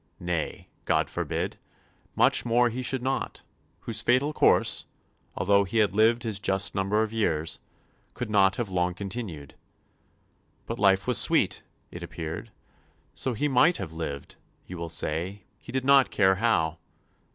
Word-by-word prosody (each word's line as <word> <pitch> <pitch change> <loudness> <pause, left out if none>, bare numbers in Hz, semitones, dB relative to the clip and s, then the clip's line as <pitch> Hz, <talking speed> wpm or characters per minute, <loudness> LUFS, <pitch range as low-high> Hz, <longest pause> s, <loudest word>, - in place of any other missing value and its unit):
Nay, 85 -3 -3 0.2
God - - +1
forbid, - - -3 0.6
much - - +3
more 120 +1 +3
he 125 +3 -4
should 130 0 -1
not, 135 +1 -3 0.4
whose 115 -2 -4
fatal 130 +5 +2
course, - - +3 0.5
although 100 +2 +3
he 100 +4 -3
had 105 -3 +3
lived 115 +2 +3
his 110 -4 -1
just 95 -1 +1
number 100 +3 +1
of 110 0 -5
years, 80 -8 -1 0.6
could 125 - -4
not 100 -2 +3
have 120 - -2
long 90 -1 -1
continued. 95 - -6 1.1
But 115 - -5
life 95 -1 +4
was 125 -2 +2
sweet, - - +2 0.3
it 90 - -8
appeared; 85 +4 -6 0.6
so 130 -3 -2
he 150 - 0
might 145 +6 +4
have 90 -5 -6
lived, 75 -4 -6 0.3
you 90 - -8
will 85 -1 -5
say, 85 +5 -3 0.2
he - - -11
did 130 0 -2
[not] 140 -1 +5
care 95 -2 +3
how. 85 -8 +1
100 Hz, 150 wpm, -27 LUFS, 90-120 Hz, 1.1 s, not